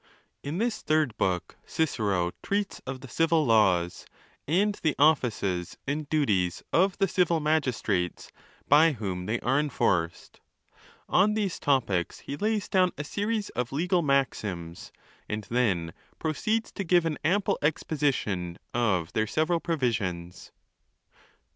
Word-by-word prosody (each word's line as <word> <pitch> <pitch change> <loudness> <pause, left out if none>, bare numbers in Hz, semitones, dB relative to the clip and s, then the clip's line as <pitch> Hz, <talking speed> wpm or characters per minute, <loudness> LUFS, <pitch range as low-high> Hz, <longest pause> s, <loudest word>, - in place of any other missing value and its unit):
In 145 +4 -4
this 230 +2 -1
Third' 155 -7 +1
Book 90 -2 -1
Cicero 100 - 0
treats 200 0 -2
of 130 0 -5
the 135 - -9
civil 165 +3 +2
laws, 95 -7 +2 0.4
and 200 +7 +2
the 155 -3 +1
offices 110 - +1
and 145 +1 -3
duties 100 - +1
of 190 +2 +3
the 195 - +2
civil 170 -2 +2
magistrates 125 - -1 0.4
by 155 +2 +6
whom 95 -6 -4
they 115 +2 0
are 135 +4 +2
enforced. 90 - -1 0.7
On 210 +3 +3
these 205 -5 -1
topics 115 -11 0
he 140 - -5
lays 210 +3 -1
down 185 -2 +2
a 150 - -3
series 210 +6 -2
of 125 -1 -3
legal 175 +5 +1
maxims, 105 - -1 0.4
and 105 0 -3
then 95 -10 +1 0.2
proceeds 215 +8 -1
to 195 - -4
give 175 -1 +3
an 160 -2 -2
ample 190 +6 +1
exposition 135 - -1 0.2
of 95 -8 0
their 110 0 +1
several 160 +7 +1
provisions. 105 - -2
140 Hz, 130 wpm, -27 LUFS, 100-165 Hz, 0.7 s, by